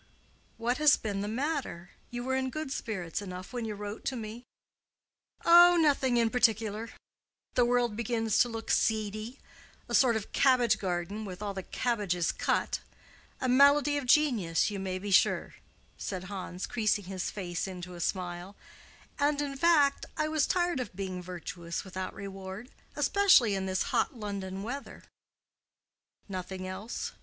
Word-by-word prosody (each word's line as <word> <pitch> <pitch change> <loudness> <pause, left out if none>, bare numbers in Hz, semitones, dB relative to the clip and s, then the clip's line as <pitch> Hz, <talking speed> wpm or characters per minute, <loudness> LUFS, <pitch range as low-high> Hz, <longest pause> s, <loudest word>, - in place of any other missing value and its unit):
"What 240 +3 -1
has 300 -1 +6
been 200 -2 -3
the 205 - -3
matter? 255 - -3 0.2
You 240 0 -5
were 260 +1 -1
in 260 0 0
good 310 0 -5
spirits 190 - -3
enough 185 +2 -8
when 240 -2 -3
you 215 -1 -4
wrote 205 +1 -6
to 265 - -1
me." 230 +1 -7 1.0
"Oh, 350 +1 +8
nothing 275 -5 +3
in 230 -1 +2
particular. 225 -2 +1 0.6
The 245 - +4
world 240 -2 +1
began 230 0 -1
to 225 +3 +3
look 225 -1 -4
seedy—a 215 +3 -3
sort 245 -4 +5
of 220 -2 -4
cabbage 255 -3 +3
garden 185 +3 -3
with 190 -1 -7
all 200 -1 -3
the 190 - -4
cabbages 195 -6 -1
cut. - - 0 0.6
A 260 - -1
malady 285 +3 +5
of 285 -3 -2
genius, 235 - +3
you 200 - -4
may 190 -1 -3
be 200 +2 -5
sure," 190 - +3 0.5
said 185 -3 -4
Hans, 185 -1 -5
creasing 215 -3 0
his 185 -1 -3
face 180 -3 -4
into 180 -1 -7
a 175 - -9
smile; 180 +2 -3 0.6
"and, 290 0 +2
in 285 -1 -2
fact, 290 -2 +3
I 305 - +1
was 310 -2 +1
tired 350 -5 +1
of 225 -7 -5
being 185 -2 -4
virtuous 175 -1 -6
without 185 -1 -6
reward, 195 +4 -8 0.2
especially 385 - +5
in 190 -1 -2
this 190 0 0
hot - - +1
London 195 -3 -5
weather." 275 +6 -6 1.2
"Nothing 185 -1 -5
else? 195 +5 -5
215 Hz, 155 wpm, -30 LUFS, 190-255 Hz, 1.2 s, Oh